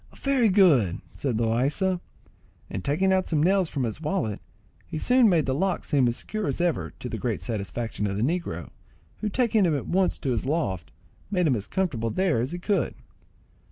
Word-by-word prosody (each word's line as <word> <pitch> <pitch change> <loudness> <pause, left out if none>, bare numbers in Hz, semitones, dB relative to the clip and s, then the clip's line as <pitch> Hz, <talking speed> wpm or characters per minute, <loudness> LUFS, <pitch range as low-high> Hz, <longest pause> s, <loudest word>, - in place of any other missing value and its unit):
"Very 270 -5 +2
good," 150 - +4
said 130 -6 -2
Loaysa, 135 - +1 0.7
and 95 - -4
taking 190 +7 +2
out 185 -1 +1
some 150 -2 +2
nails 190 -1 +3
from 135 - -2
his 115 +5 -3
wallet, 155 - -2 0.5
he - - -5
soon 245 +5 +5
made 165 -5 +3
the 130 - 0
lock 190 +6 0
seem 135 -4 +3
as 120 - 0
secure 215 -5 -4
as 140 - -1
ever, 160 - 0
to - - -6
the - - -4
great - - -2
satisfaction 110 0 -3
of 100 0 -2
the 105 - 0
negro, 170 +6 -2 0.5
who, 215 - -2
taking 225 -2 +2
him 160 -5 +2
at 135 - -5
once 185 +1 +2
to 135 - -2
his 120 +1 -1
loft, 95 - -1 0.4
made 180 -3 +1
him 140 -5 +3
as 105 -3 -4
comfortable 145 - -1
there 175 - +1
as 125 - -2
he 175 - -3
could. 195 +3 0
155 Hz, 195 wpm, -26 LUFS, 120-190 Hz, 0.7 s, soon